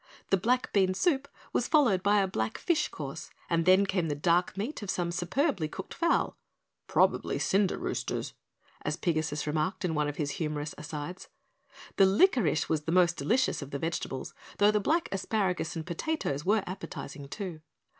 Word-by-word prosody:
The 195 - +5
black 250 +7 0
bean 190 -2 +3
soup 280 - +1 0.3
was 245 - +1
followed 245 - +4
by 205 +1 +4
a - - 0
black 110 -11 -2
fish 345 -3 +1
course, - - -7 0.3
then 185 +4 +5
came 185 -3 0
the 145 - -1
dark 175 +5 +1
meat 225 +9 -3
of 205 - -6
some 175 -2 -1
superbly 185 - 0
cooked 190 +5 -7
fowl, 335 0 +1 0.5
"probably - - +2
cinder 195 -1 +2
roosters," - - -3 0.5
as 150 +2 -2
Pigasus 155 -4 -1
remarked 155 +6 -1
in 170 - 0
one 150 -1 +1
of 145 - -4
his 145 -2 -1
humorous 150 -1 -3
asides. 150 +3 -6 0.7
The 195 - +7
licorice 200 - +3
was 155 -2 -1
the 165 - -1
most 175 -1 +4
delicious 255 +2 +1
of 140 - -7
the 140 - -3
vegetables, 140 -4 -3 0.2
though 205 +1 +5
the 210 - +2
black 320 - +1
asparagus 190 -4 -1
and 160 -1 -4
potatoes 170 - -2
were 205 +3 +2
appetizing, 145 -6 -7
too. 180 -3 -6
180 Hz, 170 wpm, -29 LUFS, 155-205 Hz, 0.7 s, The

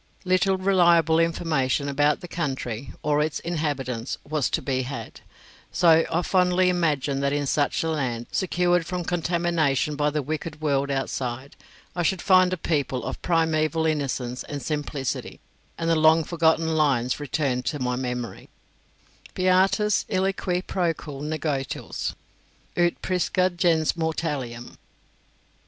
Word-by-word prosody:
Little 185 +1 +2
reliable 170 -4 +4
information 155 -5 0
about 145 +1 +2
the 175 - -7
country 135 -7 -4
or 150 0 +2
its 155 0 -1
inhabitants 140 -8 -3
was 150 -3 0
to - - 0
be 130 -1 -1
had, 135 +2 -7 0.5
so 165 -2 +5
I 175 +2 +1
fondly 180 0 +3
imagined 150 -6 0
that 140 0 +1
in 145 0 0
such 145 +3 +1
a 165 - -1
land, 125 -6 -2
secured 175 -1 +1
from 180 -1 -3
contamination 170 -4 0
by 150 0 +1
the 150 0 -2
wicked 155 +2 -4
world 140 -2 0
outside, 135 -1 -3 0.4
I 175 - -1
should 180 +2 +1
find 185 +1 +4
a 185 - -1
people 140 -6 -1
of - - -5
primeval 160 -1 +1
innocence 135 -5 -1
and 145 - -5
simplicity, 145 -2 -3 0.4
and 165 - -2
the 165 - +3
long 160 +1 +5
forgotten 160 0 +2
lines 140 -6 +1
returned 135 -3 -1
to 150 - -1
my 125 -2 -1
memory: 125 -2 -5 0.9
"Beatus 190 +3 +3
ille 190 +1 +1
qui 180 -2 -2
procul 165 -7 -2
negotils, 150 -3 -3 0.6
Ut 175 -1 +1
prisca 185 0 +1
gens 170 -3 +2
mortalium." 140 - -3
155 Hz, 135 wpm, -25 LUFS, 140-175 Hz, 0.9 s, so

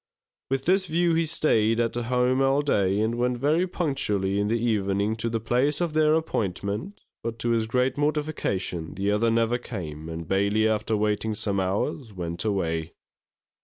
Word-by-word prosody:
With 135 0 -1
this 190 +1 +3
view 170 +1 +2
he 165 0 +1
staid 115 -8 +2
at 115 -1 +1
home 125 +2 +1
all 135 +2 +3
day, 100 -8 +1
and 115 +2 0
went 125 0 +1
very 155 +8 +2
punctually 105 - 0
in 100 - +1
the 115 +2 +1
evening 105 -2 0
to 115 +1 -1
the 115 0 -1
place 125 +6 +1
of 170 -3 -1
their 155 0 +4
appointment; 105 - -2 0.2
but 115 0 -4
to 120 0 -1
his 115 -1 +1
great 125 +3 0
mortification 145 - -2
the 100 +2 0
other 110 +3 +2
never 115 +1 +1
came, 80 -10 -7
and 80 0 -6
Bailey, 100 +4 +2
after 110 0 0
waiting 105 +1 0
some 100 -1 -1
hours, 105 +6 -2
went 85 -2 -4
away. 85 -6 -1
115 Hz, 170 wpm, -26 LUFS, 100-135 Hz, 0.2 s, their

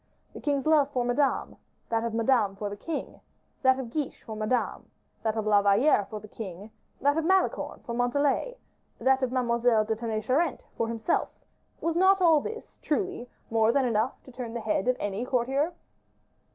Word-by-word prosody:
The - - -9
king's 280 -2 0
love 305 -3 +4
for 250 -4 -1
Madame, 270 +3 0 0.3
that 225 0 0
of 230 -1 -2
Madame 225 -4 +2
for 205 0 -4
the - - -4
king, 320 +10 -5 0.4
that 260 -1 +4
of 250 -3 -5
Guiche 295 -1 -4
for 220 - -7
Madame, 215 +4 -1 0.3
that 220 -1 -1
of 220 -1 -2
La 205 -1 +5
Valliere 205 +3 +4
for 215 - -5
the 215 - -12
king, 200 -1 -8 0.3
that 285 +3 +3
of - - -1
Malicorne 380 +3 +1
for 235 - -4
Montalais, 285 - 0 0.4
that 265 0 +2
of 255 -2 0
Mademoiselle 235 -3 +2
de 220 +1 -1
Tonnay 220 -1 -3
Charente 275 +6 0
for 230 - -1
himself, 230 +7 0 0.5
was 330 0 0
not 380 +2 +5
all 325 -5 +5
this, 450 +6 -8
truly, 310 -6 -2 0.2
more 225 0 +4
than 275 +1 +2
enough 230 +1 +1
to 260 - -13
turn 240 -2 -6
the - - -1
head 215 -1 -1
of 255 - +3
any 205 +3 -2
courtier? 265 +5 0
245 Hz, 185 wpm, -28 LUFS, 220-285 Hz, 0.5 s, La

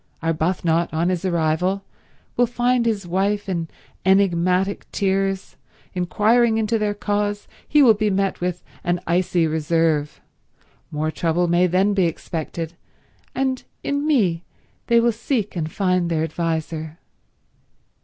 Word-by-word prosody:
Arbuthnot, 165 +1 +1
on 165 +3 0
his 185 0 -1
arrival 180 +3 0 0.5
will 245 - +3
find 245 0 +1
his 210 -4 -1
wife 200 +4 0
in 170 -4 -2 0.4
enigmatic 190 0 +2
tears. 195 -1 -1 0.4
Inquiring 220 +6 +2
into 225 +1 +1
their 210 -1 0
cause, 205 0 -1 0.2
he 295 -1 +5
will 235 -4 +7
be 215 0 0
met 195 -1 0
with 180 0 -2 0.2
an 175 0 0
icy 175 0 +2
reserve. 160 -1 0 0.7
More 155 +1 -2
trouble 170 +2 0
may 175 +1 +3
then 190 +4 +2
be 190 -3 +2
expected, 165 0 -5 0.6
and 260 -1 -1 0.2
in 285 +1 -1
me 190 - +2 0.4
they 235 0 +5
will 235 0 +3
seek 225 -2 -2
and 160 -2 -3
find 180 -3 +1
their 160 -2 0
adviser. 160 -1 -3
185 Hz, 130 wpm, -22 LUFS, 165-210 Hz, 0.7 s, will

